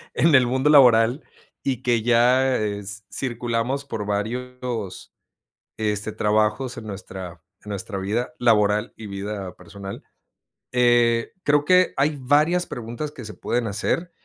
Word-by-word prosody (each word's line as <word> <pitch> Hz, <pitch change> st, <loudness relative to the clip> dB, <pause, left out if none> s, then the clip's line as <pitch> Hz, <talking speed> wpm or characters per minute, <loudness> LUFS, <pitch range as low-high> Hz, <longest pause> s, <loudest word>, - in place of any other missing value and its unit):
en 160 Hz, 0 st, +3 dB
el 125 Hz, -2 st, +5 dB
mundo 130 Hz, +4 st, +1 dB
laboral 125 Hz, -1 st, +6 dB, 0.4 s
y 130 Hz, -2 st, -2 dB
que 120 Hz, -2 st, +2 dB
ya 125 Hz, +3 st, +3 dB
eh, 105 Hz, -1 st, -2 dB
s 105 Hz, +1 st, -7 dB
circulamos 120 Hz, +2 st, -2 dB
por 110 Hz, -7 st, -4 dB
varios, 120 Hz, 0 st, -4 dB, 0.7 s
este, 105 Hz, -1 st, -1 dB
trabajos 110 Hz, +5 st, 0 dB
en 110 Hz, -, -8 dB
nuestra 95 Hz, -4 st, -8 dB, 0.2 s
en 105 Hz, -, -10 dB
nuestra 100 Hz, 0 st, -4 dB
vida 110 Hz, +6 st, -2 dB
laboral 105 Hz, -3 st, +2 dB
y 110 Hz, -, -9 dB
vida 100 Hz, -1 st, -5 dB
personal, 95 Hz, +3 st, -9 dB, 0.7 s
eh, 120 Hz, -2 st, +3 dB
creo 145 Hz, 0 st, +3 dB
que 185 Hz, +1 st, +4 dB
hay 145 Hz, +2 st, +1 dB
varias 155 Hz, +7 st, +2 dB
preguntas 120 Hz, +5 st, -5 dB
que 130 Hz, -, -10 dB
se 105 Hz, -, -7 dB
pueden 120 Hz, -1 st, -2 dB
hacer 110 Hz, -, -2 dB
115 Hz, 140 wpm, -23 LUFS, 105-130 Hz, 0.7 s, laboral